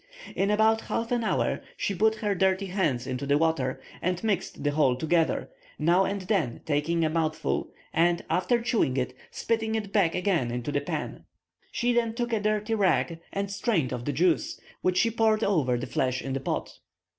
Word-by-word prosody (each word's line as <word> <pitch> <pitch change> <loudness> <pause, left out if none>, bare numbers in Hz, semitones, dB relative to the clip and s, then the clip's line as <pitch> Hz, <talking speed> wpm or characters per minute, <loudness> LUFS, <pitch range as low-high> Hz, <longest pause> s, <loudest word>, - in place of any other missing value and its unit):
In 195 - +1
about 220 +1 +3
half 230 +1 -3
an 240 -1 +1
hour 220 - 0 0.2
she 200 - -1
put 220 +4 +3
her 210 -2 -1
dirty 190 +1 +1
hands 180 -11 0
into 130 +1 -4
the 140 +1 +4
water, 155 -5 0 0.2
and 180 +2 -1
mixed 200 -9 -1
the 145 - +2
whole 145 -4 +3
together, 160 - 0 0.3
now 175 +5 +3
and 200 +1 -2
then 180 - 0
taking 160 +3 +1
a - - +1
mouthful, 155 - -1 0.2
and, 170 +1 +2
after 185 +7 +2
chewing 230 - +1
it, 125 -1 -1 0.2
spitting 225 -1 -1
it 205 -3 -4
back 180 -6 +3
again 180 -9 +1
into 120 +3 -3
the 145 - 0
pan. 145 - -5 0.5
She 245 0 +1
then 230 -1 +1
took 240 -1 -2
a 220 - +2
dirty 215 +1 0
rag, 165 -7 +1
and 200 0 -3
strained 195 - 0
off 120 -1 -5
the 145 - 0
juice, 165 +4 +1 0.2
which 185 0 +1
she 230 - +3
poured 220 -1 +2
over 145 -11 +2
the 125 - -4
flesh 130 -1 0
in 135 - -3
the 135 - -1
pot. 135 - -4
180 Hz, 190 wpm, -27 LUFS, 145-215 Hz, 0.5 s, the